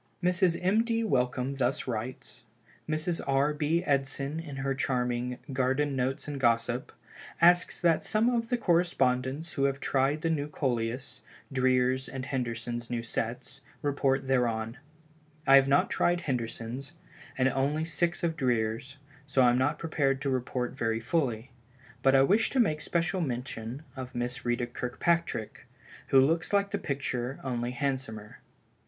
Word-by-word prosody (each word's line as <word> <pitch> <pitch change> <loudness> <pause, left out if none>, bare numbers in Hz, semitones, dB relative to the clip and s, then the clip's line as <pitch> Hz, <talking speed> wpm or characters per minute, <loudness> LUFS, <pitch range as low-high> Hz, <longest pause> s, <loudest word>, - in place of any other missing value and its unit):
Mrs. 180 -1 +3
M. 205 +5 +3
D. 230 -1 0
Wellcome 130 - 0
thus 130 0 0
writes: 120 +1 -5 0.5
"Mrs. 160 +2 -1
R. 140 +2 +2
B. 155 +4 0
Edson 140 +1 -1
in 150 -4 -7
her 135 0 -1
charming 125 -2 -1 0.2
'Garden 135 +2 +1
Notes 130 +2 -1
and 145 -2 -4
Gossip,' 120 0 +1 0.5
asks 175 +1 +4
that 170 -3 +3
some 220 +2 +2
of 235 -2 0
the 245 - +1
correspondents 160 - +1
who 140 - +1
have 140 0 0
tried 140 +3 +1
the 165 - +1
new 145 -2 -1
Coleus, 125 -3 -2 0.3
Dreer's 130 0 +2
and 130 -1 -5
Henderson's 120 -2 -3
new 120 -1 -2
sets, 120 +4 -4 0.2
report 135 -2 +1
thereon. 120 -2 0 0.7
I 135 0 +8
have 135 0 +5
not 140 +1 +3
tried 175 0 +2
Henderson's, 120 0 -4 0.4
and 130 0 +3
only 145 +4 0
six 170 +3 0
of 165 -2 +1
Dreer's, 120 -2 -1 0.3
so 135 -1 +3
I 120 - +6
am 120 - +2
not 145 +4 +1
prepared 140 -5 0
to 135 0 0
report 125 -1 -1
very 115 -4 -1
fully. 120 -3 -1 0.5
But 135 0 +4
I 135 - +6
wish 210 +10 +3
to 265 - 0
make 155 -10 +2
special 175 +2 0
mention 125 -1 -4
of 130 -1 -7
Miss 120 +3 -3
Ritta 120 0 0
Kirkpatrick, 125 0 -2 0.4
which 135 - +7
looks 165 +4 +1
like 200 -1 +2
the - - -1
picture 135 -2 -3
only 120 -2 -2
it - - -5
is 120 - -10
handsomer. 130 -7 -3
135 Hz, 155 wpm, -29 LUFS, 125-155 Hz, 0.7 s, I